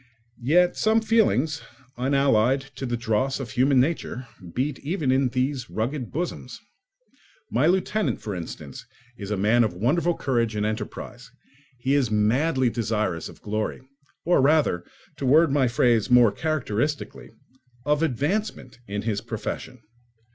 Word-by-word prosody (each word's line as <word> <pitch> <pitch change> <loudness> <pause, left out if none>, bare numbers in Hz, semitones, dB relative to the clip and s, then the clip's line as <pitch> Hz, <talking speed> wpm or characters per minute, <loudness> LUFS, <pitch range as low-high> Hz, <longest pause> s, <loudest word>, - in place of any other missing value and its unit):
Yet 175 +8 +3
some 220 +1 +3
feelings, 205 - +2 0.3
unallied 135 -1 +2 0.2
to 135 - -4
the 120 0 -1
dross 120 +4 0
of 125 -5 -6
human 130 +1 +3
nature, 130 -3 -1 0.3
beat 135 +2 -1
even 150 -3 -1
in 130 0 +3
these 130 0 -2
rugged 120 +3 -3
bosoms. 175 +4 -4 0.9
My 155 - +3
lieutenant, 190 +4 +1
for 105 - -5
instance, 80 -5 -8 0.3
is 100 -4 -7
a 105 - -1
man 110 +5 +3
of 105 -6 -1
wonderful 165 - +1
courage 115 -4 0
and 105 0 0
enterprise; 110 +2 -5 0.5
he 130 +3 0
is 140 -5 +2
madly 125 +5 +2
desirous 110 -7 -2
of - - -15
glory, 105 +1 -2 0.5
or 175 -4 +4
rather, 140 - +3 0.3
to 140 - -4
word 155 +3 +5
my 135 -2 +3
phrase 120 -1 +2
more 120 -3 +6
characteristically, 150 +1 -2 0.6
of 150 +1 +2
advancement 150 - -2
in 100 0 -4
his 105 -3 -1
profession. 125 -3 -6
130 Hz, 140 wpm, -25 LUFS, 110-150 Hz, 0.9 s, more